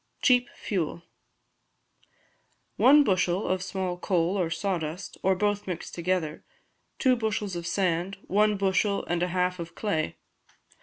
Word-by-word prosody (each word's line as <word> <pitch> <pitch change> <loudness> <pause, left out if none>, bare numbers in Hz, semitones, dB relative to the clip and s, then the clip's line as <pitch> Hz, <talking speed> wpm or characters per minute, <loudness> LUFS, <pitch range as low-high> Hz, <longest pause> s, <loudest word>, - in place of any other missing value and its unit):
Cheap 250 -2 +4
Fuel 170 -3 -3 1.7
One 290 +3 +7
bushel 185 -3 +1
of 185 0 0
small 185 -1 -3
coal 180 0 +1
or 180 -4 0
sawdust, 170 0 -3
or 190 0 +3
both 205 +1 0
mixed 180 -3 -5
together, 170 -3 -2 0.5
two 255 -1 +3
bushels 210 -4 -2
of 170 -1 -4
sand, 185 +1 0
one 210 +1 +2
bushel 200 +1 +1
and 175 0 -1
a 180 - +2
half 180 0 0
of 170 0 -7
clay. 160 -8 -1
185 Hz, 135 wpm, -27 LUFS, 175-205 Hz, 1.7 s, One